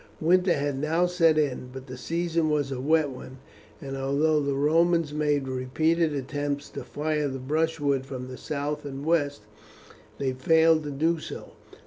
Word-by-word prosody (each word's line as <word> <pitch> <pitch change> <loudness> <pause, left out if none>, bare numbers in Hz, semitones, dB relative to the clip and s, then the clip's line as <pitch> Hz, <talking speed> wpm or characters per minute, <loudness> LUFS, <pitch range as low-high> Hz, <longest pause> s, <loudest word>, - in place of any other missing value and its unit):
Winter 180 +2 +3
had 140 -2 -2
now 165 +4 +2
set 165 -3 +3
in, 130 -4 0
but 130 0 -9
the 130 -2 -8
season 165 +4 -1
was 145 -2 0
a 130 -1 -3
wet 155 0 +2
one, 130 0 -10 0.4
and 135 0 -6
although 140 +3 +1
the 140 -1 -1
Romans 165 +2 +2
made 150 -2 0
repeated 155 +6 +1
attempts 145 +1 -3
to - - -6
fire 150 0 -1
the 135 -1 -4
brushwood 145 0 0
from 130 -2 -7
the 130 - -7
south 145 0 -3
and 140 0 -6
west, 145 -7 +1 0.7
they 135 -2 -1
failed 160 +4 +4
to - - -3
do 160 +4 0
so. - - -8
145 Hz, 165 wpm, -26 LUFS, 135-160 Hz, 0.7 s, failed